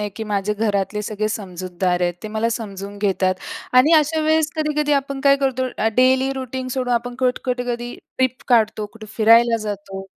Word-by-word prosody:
आहे, 210 - -2
की 220 - -4
माझे 205 -1 -1
घरातले 210 -1 -1
सगळे 215 0 -2
समजूतदार 185 -3 -2
आहेत. 175 -1 +1
ते 215 - -5
मला 220 +2 -1
समजून 200 -3 -6
घेतात 190 -2 +1 0.4
आणि 285 +6 +6
अशा 310 +1 +3
वेळेस 310 0 +2
कधी-कधी 300 -1 0
आपण 275 -1 -1
काय 275 0 +6
करतो? 260 -1 +1
अ, 220 - +2
डेली 260 +1 +4
रूटीन 260 -1 -5
सोडून 250 -2 -1
आपण 245 +1 -2
कट 255 -1 +1
कुठे 250 -1 -1
कधी 240 0 -4 0.2
ट्रिप 260 -1 0
काढतो, 220 -3 +2
कुठे 225 -1 -11
फिरायला 230 +1 +5
जातो. 195 -1 -6
230 Hz, 185 wpm, -21 LUFS, 205-260 Hz, 0.4 s, आणि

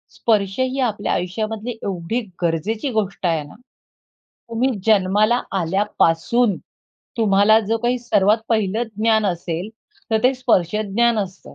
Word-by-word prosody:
स्पर्श 205 -1 0
ही 260 +1 0
आपल्या 220 -5 -1
आयुष्यामधली 215 +5 -3
एवढी 195 +5 -2 0.2
गरजेची 200 - -1
गोष्ट 200 -4 -2
आहे 165 -3 +1
ना, 145 - -14 0.9
तुम्ही 235 +3 +1 0.2
जन्माला 215 +3 +3 0.2
आल्यापासून 195 +3 +1 0.6
तुम्हाला 210 0 +4
जो 225 +2 -1
काही 245 +2 0
सर्वात 210 -2 +2
पहिलं 220 -1 +1 0.2
ज्ञान 220 -1 +2
असेल, 175 +1 -3 0.4
तर 220 - +3
ते 260 +2 +4
स्पर्श 210 -8 +1
ज्ञान 215 +2 +1
असतं. 190 -2 -6
215 Hz, 125 wpm, -20 LUFS, 190-230 Hz, 0.9 s, तुम्हाला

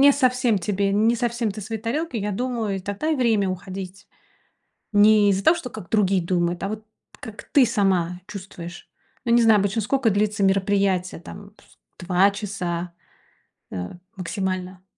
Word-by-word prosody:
не 280 +1 +8
совсем 250 -5 +2
тебе, 195 +1 0
не 220 +4 +3
совсем 235 -1 -1
ты 205 +2 -7
своей 220 +1 -5
тарелке, 255 +4 -2
я 210 0 -2
думаю, 230 -2 -2
и - - -3
тогда 200 +11 -3
и 315 - +1
время 225 -6 +2
уходить. 185 +1 -6 0.9
Не 205 0 +6
из-за 195 0 +1
того, 325 - +5
что 250 - -6
как 215 -7 -10
другие 195 -3 +2
думают, 175 0 -1
а - - 0
вот 215 +1 -6 0.3
как 220 -1 -9
ты 275 -3 +6
сама 185 -6 0
чувствуешь. 180 -3 -9 0.4
Ну, 235 - +2
не 240 - +6
знаю, 225 -2 +6
обычно 200 +3 0
скока 255 +3 +1
длится 210 0 +1
мероприятие, 195 -2 +1
там, 200 +3 -11
с - - -24 0.3
2 185 +2 +4
часа, 180 -4 -4 0.8
э, 90 -1 -5 0.3
максимально. 185 0 -4
200 Hz, 165 wpm, -23 LUFS, 185-225 Hz, 0.9 s, не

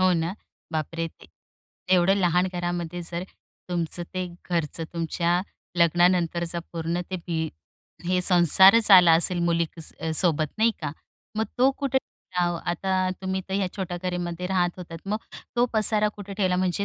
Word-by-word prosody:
हो 185 0 +4
ना, 170 +2 -1 0.4
बापरे! 165 +1 -2
ते - - -16 0.7
एवढं 185 +2 +4
लहान 180 -1 +2
घरामध्ये 175 -1 -3
जर 170 +1 -4 0.5
तुमचं 175 0 -2
ते 185 -1 -2 0.2
घरचं 165 -1 -1
तुमच्या 170 +1 0 0.4
लग्नानंतरचा 175 0 +2
पूर्ण 165 +1 -2
ते 185 - -2
भी 160 -2 -1 0.6
हे 180 0 +2
संसारच 190 +5 +6
आला 180 -3 +9
असेल 180 0 +2
मुली 170 0 +2
क - - -9 0.4
सोबत 155 -4 +2
नाही 230 +1 +4
का. 145 -2 -3 0.4
मग 220 - +1
तो 260 +2 +5
कुठे 270 -1 +1 0.4
आता, 175 +2 0
तुम्ही 190 0 -1
तर 190 - -3
ह्या 195 -1 +1
छोट्या 180 -2 -3
घरामध्ये 180 -1 -3
राहत 180 -1 0
होतात. 165 -2 -8
मग 210 +2 -1 0.4
तो 240 - +4
पसारा 215 0 +3
कुठे 200 -1 -8
ठेवला, 185 -3 +1
म्हणजे 185 +2 0
175 Hz, 150 wpm, -25 LUFS, 170-190 Hz, 0.7 s, आला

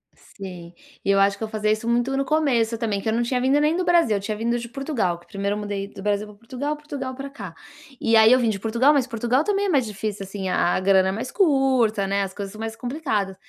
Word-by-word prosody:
Sim, 180 -4 -10 0.3
e 200 - +3
eu 195 - +3
acho 200 0 +3
que - - -6
eu - - -2
fazia 215 -1 -1
isso 215 +2 -2
muito 240 +3 +1
no 275 - 0
começo 255 -7 +1
também 215 -3 -2
que - - -6
eu - - 0
não 235 - +1
tinha 250 +1 0
vindo 265 +3 +3
nem 300 +2 +2
do 365 - 0
Brasil, 335 -13 +3
tinha 210 +2 -3
vindo 235 +3 -1
de 235 0 -6
Portugal, 245 - -2
que 175 - -23
primeiro 200 0 -2
eu - - -4
mudei 205 -1 -4
do - - -9
Brasil 205 +1 0
para 210 - -14
Portugal, 255 +7 -4
Portugal 285 -3 -6
pra 275 +2 -7
cá. 200 -11 -9 0.5
E 230 - +3
aí 220 +1 +7
eu 255 - +6
vim 235 -2 +2
de 205 -2 -2
Portugal, 235 +8 +3
mas 275 -4 +2
Portugal 240 +4 0
também 405 +1 0
é - - 0
mais 275 -8 +2
difícil, 210 -1 -4
assim, 195 0 -5
a 180 - +2
a - - 0
grana 190 0 +3
é - - 0
mais 220 +6 -5
curta, 265 - +2
né, 200 +1 0
as 190 -1 -5
coisas 200 -1 -6
são 215 - -12
mais 225 0 -4
complicadas. 230 -6 -2
225 Hz, 265 wpm, -23 LUFS, 200-265 Hz, 0.5 s, aí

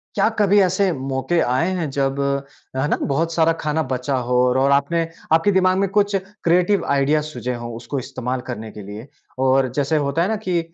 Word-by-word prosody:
क्या 200 +1 +3
कभी 205 0 +4
ऐसे 190 +1 +2
मौके 135 +4 -1
आए 130 +8 +1
हैं 165 -5 -2
जब, 135 0 -1 0.6
है 130 +3 0
ना? - - +1
बहुत 165 +4 0
सारा 165 0 +3
खाना 150 +1 0
बचा 130 +2 -1
हो 125 - +1
और 130 +2 +2
आपने 165 +4 +1 0.3
आपके 165 +5 +4
दिमाग 185 -1 +3
में 195 0 +2
कुछ 200 0 +1 0.3
क्रिएटिव 180 +4 +2
आइडिया 140 +2 +2
सुझे 125 -3 -4
हो 120 0 -6
उसको 135 +4 -4
इस्तेमाल 130 -1 -4
करने 110 -3 -5
के 105 - -10
लिए? 105 +5 -9 0.3
और 130 0 +3
जैसे 145 +2 +1
होता 145 +2 0
है 180 - +2
ना, 220 - 0
कि 185 -5 -1
145 Hz, 195 wpm, -21 LUFS, 130-175 Hz, 0.6 s, कभी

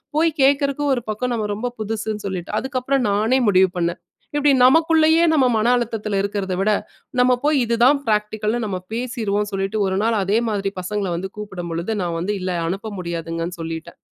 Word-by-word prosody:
போய் 330 +2 +4
கேக்குறதுக்கு 280 +1 +2
ஒரு 245 - -3
பக்கம் 245 +3 -2
நம்ம 215 -2 -1
ரொம்ப 245 +4 -3
புதுசுன்னு 215 -1 -3
சொல்லிட்டு. 185 -3 -5
அதுக்கப்புறம் 265 0 -1
நானே 220 +6 +2
முடிவு 190 -1 +5
பண்ணேன். 170 0 -1 0.3
இப்டி 290 0 +4
நமக்குள்ளேயே 320 +3 +5
நம்ம 275 -4 +4
மன 215 +2 +1
அழுத்தத்துல 220 -4 -2
இருக்கறத 200 -2 -2
விட, 210 +2 +2 0.5
நம்ம 250 0 +5
போய் 300 0 +3
இதுதான் 240 +5 +4
பிராக்டிகல்னு 215 +1 0
நம்ம 190 -3 -2 0.2
பேசிருவோம்னு 220 -4 -2
சொல்லிட்டு, 195 +2 -2
ஒரு 190 0 -1
நாள் 225 0 +2
அதே 200 +4 +1
மாதிரி 200 -2 -1
பசங்கள 200 0 -2
வந்து 185 +3 -3
கூப்டும்பொழுது, 175 -2 -4
நான் 170 -2 -2
வந்து 195 +5 -1
இல்ல, 185 0 -2 0.2
அனுப்ப 195 +5 -3
முடியாதுங்கன்னு 165 0 -4
சொல்லிட்டேன். 165 +1 -6
210 Hz, 165 wpm, -21 LUFS, 190-250 Hz, 0.5 s, முடிவு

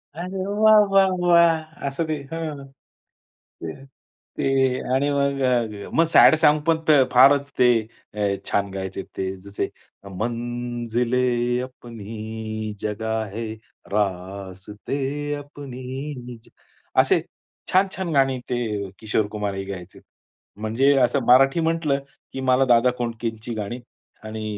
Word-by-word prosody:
अरे 185 +2 -4
वाह 215 +1 +5
वाह 195 -1 +6 0.2
वाह! 165 -3 +3
असं 140 +4 -2
ते. 155 - -1 0.2
हं, 155 -4 -5 1.7
ते 135 -1 +2 0.2
आणि 140 +2 +1
मग 140 -1 0
अ, 115 -5 0
मग 165 - +5
सॅड 160 - +8
सॉन्ग 150 -1 +5
पण 160 - +4 0.4
फारच 140 +2 +6
ते 125 -1 +6 0.8
छान 100 0 0
गायचे 95 0 -5
ते. 95 0 -2
जसे 100 +1 -4 0.5
मंजिले 120 +1 -2 0.4
अपनी 110 -3 -6
जगह 110 +1 -2
है, 115 -1 -4 0.4
रास्ते 100 +4 -3 0.4
अपनी 135 -2 -7
जगह - - -2
असे - - +2 0.5
छान-छान 190 -1 +1
गाणी 135 -2 +2
ते 110 -5 -2
किशोर 110 -1 0
कुमार 105 -2 -3
ही 95 0 -4
गायचे. 95 -2 -8 0.6
म्हणजे 115 +6 +2
असं 140 - 0
मराठी 135 +5 +6
म्हटलं 160 -4 +1 0.3
की 135 - -4
मला 130 0 +3
दादा 120 0 +4
कोंडकेची 115 -1 -4
गाणी 110 +4 -4 0.5
आणि 110 0 -5
125 Hz, 110 wpm, -23 LUFS, 110-140 Hz, 1.7 s, सॅड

